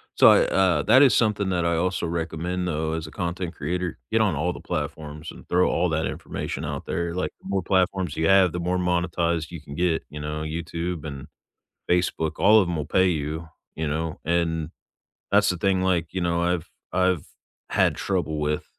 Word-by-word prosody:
so - - +7
I, - - +8
uh, 90 -6 +2
that 130 - +6
is 130 -6 +6
something 105 -3 +2
that 85 -2 0
I 85 -1 +1
also 90 +1 0
recommend 85 +2 -2
though 80 -1 -1
as 80 -1 -4
a - - -11
content 90 -1 -4
creator. 90 +3 -3
Get 115 - +3
on 105 -6 +2
all 85 +5 0
the - - -8
platforms 75 0 -5
and - - -14
throw 90 +1 +3
all 90 +2 +1
that 80 0 0
information - - -4
out - - -4
there, 85 0 -2
like, 90 - -2
the - - -12
more 100 -1 +1
platforms 90 -3 +1
you 80 - +2
have, 95 -2 +5
the 90 - -4
more 90 +2 0
monetized 85 -2 0
you 85 - -7
can 70 -2 -10
get, 85 0 +1
you 75 - -8
know, 75 +1 -4
YouTube 85 +1 -4
and 70 0 -7 0.6
Facebook, 90 -3 +1
all 105 +2 +6
of 90 - -1
them 85 - -2
will 75 -2 -2
pay 95 +4 +3
you, 80 0 -2 0.3
you 80 -1 -2
know, 80 +2 -3
and 80 -1 0 0.6
that's 100 0 +4
the 90 - -2
thing, 95 +1 +1
like, 90 -3 +1
you 95 - -2
know, 85 0 +1
I've 85 -2 0 0.3
I've 90 -4 +1 0.4
had - - +3
trouble 85 -6 -1
with, 75 0 -1
85 Hz, 205 wpm, -25 LUFS, 80-90 Hz, 0.6 s, I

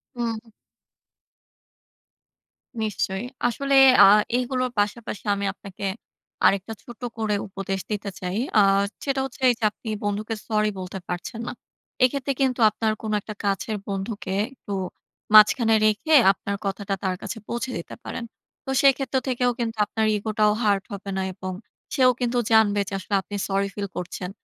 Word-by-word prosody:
হুম। 230 -1 -4 2.3
নিশ্চয়ই। 205 0 -2 0.2
আসলে 275 +3 -1 0.3
আ - - +10 0.3
এগুলো 255 0 -1
পাশাপাশি 210 +1 -2
আমি 200 0 -3
আপনাকে 195 0 -10 0.6
আরেকটা 195 +3 +2
ছোট 240 -4 -12 0.2
করে 215 -2 0
উপদেশ 195 0 -4
দিতে 205 -1 -3
চাই। 180 +1 -3 0.2
আ - - +8 0.4
সেটা 275 -1 0
হচ্ছে 270 - -8
এইযে 235 -2 -2
আপনি 220 - -11 0.2
বন্ধুকে 210 +2 -2
সরি 215 -1 +1
বলতে 185 +1 -6
পারছেন 180 +6 -5
না। - - -3 0.5
এক্ষেত্রে 275 +1 +1
কিন্তু 260 -2 +1
আপনার 220 +1 -1
কোন 215 -1 -3
একটা 215 +1 -8
কাছের 200 +2 -1
বন্ধুকে 195 0 -4 0.2
একটু 205 -6 -9 0.6
মাঝখানে 225 +1 +7
রেখে 215 +9 +1 0.2
আপনার 200 +1 -4
কথাটা 195 0 -2
তার 185 -1 0
কাছে 230 - -5
পৌঁছে 240 +2 -3
দিতে 170 - -8
পারেন। 235 - -5 0.4
তো 265 - -4
সেক্ষেত্র 270 0 +3
থেকেও 250 -1 +1
কিন্তু 230 -1 -2
আপনার 220 -1 -1
ইগোটাও 210 0 +1
হার্ট 200 -2 +2
হবে 200 0 -6
না 190 - 0
এবং 185 -1 -5 0.4
সেও 255 -3 +5
কিন্তু 245 0 0
জানবে। 210 -2 +5 0.2
আসলে 200 - -4
আপনি 205 - -6
সরি 195 0 0
ফিল 200 -1 -4
করছেন। 180 +1 -5
215 Hz, 145 wpm, -24 LUFS, 200-240 Hz, 2.3 s, আ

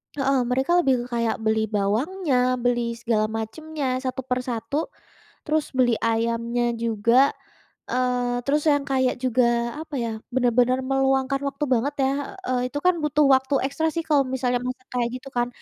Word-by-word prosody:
Heeh, 275 -1 +1
mereka 265 +6 0
lebih 260 -6 +2
ke - - -8
kayak 230 -1 +1
beli 220 0 +1
bawangnya, 250 - +1
beli 240 -1 0
segala 225 -2 0
macemnya, 255 +4 -3
satu 260 -1 -4
per 250 0 -1
satu, 250 +5 -3 0.6
terus 310 0 0
beli 250 -3 +2
ayamnya 235 +1 0
juga, 230 +4 +3 0.6
eee, 245 -1 0
terus 295 +1 +1
yang 285 -1 +3
kayak 260 -2 +1
juga 250 0 +2 0.4
apa 305 -2 -7
ya, 235 -2 -1 0.3
benar-benar 250 +1 +3
meluangkan 270 0 +1
waktu 280 +2 -2
banget 270 +5 0
ya. 265 - +2 0.4
Eee, 250 0 0
itu 290 - -4
kan 365 -1 +5
butuh 300 0 +3
waktu 265 +2 -1
ekstra 315 +3 -1
sih 330 - -1
kalau 285 -2 +4
misalnya 250 -1 0
masak 255 0 -6
kayak 240 -1 0
gitu 265 +2 -8
kan. 240 - +2
255 Hz, 160 wpm, -24 LUFS, 235-275 Hz, 0.6 s, kan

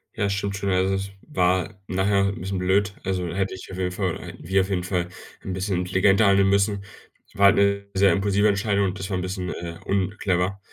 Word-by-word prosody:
Ja, 100 - 0
stimmt 100 0 -2
schon. 100 0 -2
Also, 95 +1 +2
es 95 0 -3
war 95 -5 0
nachher 100 +1 +2
'n 100 - -4
bisschen 95 +1 -3
blöd. 95 +2 +1
Also, 90 -2 -1
hätte 95 0 -1
ich 95 - -10
auf 95 - -7
jeden 90 -1 -1
Fall 90 -3 -2
hätten - - -10
wir 95 +1 +3
auf 95 - -3
jeden 90 -2 -1
Fall 90 -1 -1 0.3
'n 95 - -5
bisschen 95 0 -1
intelligenter 95 +3 +3
handeln 100 0 +4
müssen. 100 0 +1 0.5
War 100 - +3
halt 100 - +7
'ne 100 0 +2
sehr 95 -1 +4
impulsive 100 +3 +2
Entscheidung 100 0 +1
und 95 +1 -4
das 95 +1 -5
war 95 - -1
'n 90 - -2
bisschen, 90 0 -4
äh, 85 -1 -7
unclever. 95 -1 0
95 Hz, 220 wpm, -24 LUFS, 95-100 Hz, 0.5 s, halt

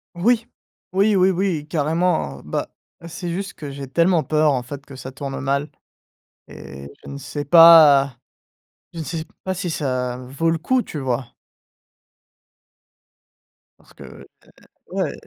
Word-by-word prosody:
Oui! 230 +6 +1 0.5
Oui, 200 +2 +3
oui, 185 0 +4
oui, 180 -5 -1
carrément, 155 - -1
bah, 75 - -3 0.4
c'est 175 +1 -6
juste 195 +4 -4
que 145 -2 -8
j'ai 140 -1 -8
tellement 170 +4 +2
peur, 155 -1 +2
en 130 -2 -1
fait, 140 +3 -9
que 140 - -13
ça 130 0 -8
tourne 135 +1 -6
mal 140 +2 -1 0.8
et 70 +1 -10 0.2
je - - -11
ne 140 - -7
sais 145 +1 -6
pas 150 -5 +7 0.8
je 165 - -7
ne - - -4
sais 160 0 -4 0.2
pas 190 - -2
si 185 0 -4
ça 130 -6 -2
vaut 135 +6 -3
le 165 0 +1
coup, 250 +10 +1
tu 155 - -8
vois? 130 -2 -3 2.5
Parce - - -23
que - - -13
heu, - - -13 0.7
ouais. - - -2
155 Hz, 150 wpm, -21 LUFS, 135-175 Hz, 2.5 s, pas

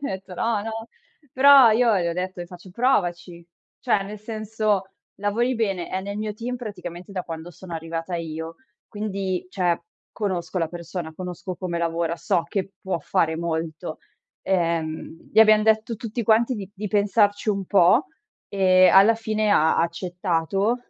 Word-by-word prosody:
gli 285 - -3
ho - - -2
etto: 190 -1 -7
"No, 215 +2 0
no". 225 +1 -6 0.4
Però 270 -2 +8
io 225 -2 +3
gli 170 - -1
ho 170 - 0
detto 180 +1 -4
le 175 - -6
faccio: 180 +1 -13
"Provaci". 180 -7 0 0.4
Cioè, 215 -6 +1
nel 210 +1 -8
senso, 215 -2 -2 0.3
lavori 225 +5 0
bene, 195 -6 -1
è 185 - -2
nel 200 +1 -5
mio 215 0 -3
team 240 +4 -4
praticamente 180 -6 -8
da 185 -2 -3
quando 165 +1 -7
sono 175 +1 -12
arrivata 165 +2 -4
io, 160 0 -5 0.3
quindi, 195 -3 -3
cioè, 180 -3 +1 0.4
conosco 185 -4 -2
la 165 -2 0
persona, 170 -1 -6
conosco 180 +1 -6
come 170 -2 -3
lavora, 170 0 -1
so 175 0 0
che 195 -1 -3
può 190 -2 -2
fare 160 0 0
molto, 160 -1 -4 0.4
ehm, 165 -3 -2
gli 220 - +2
abbiam 215 -1 +6
detto 220 +1 +2
tutti 230 +2 -4
quanti 230 +3 +3
di 200 -3 -7
di 205 +1 -5
pensarci 205 +1 +2
un 200 -2 0
po' 195 - +4 0.4
e, 185 -2 +5
alla 200 +4 +7
fine, 215 -1 -1
ha 160 -5 +4
ha - - +4
accettato 180 +4 -1
190 Hz, 165 wpm, -24 LUFS, 170-215 Hz, 0.4 s, Però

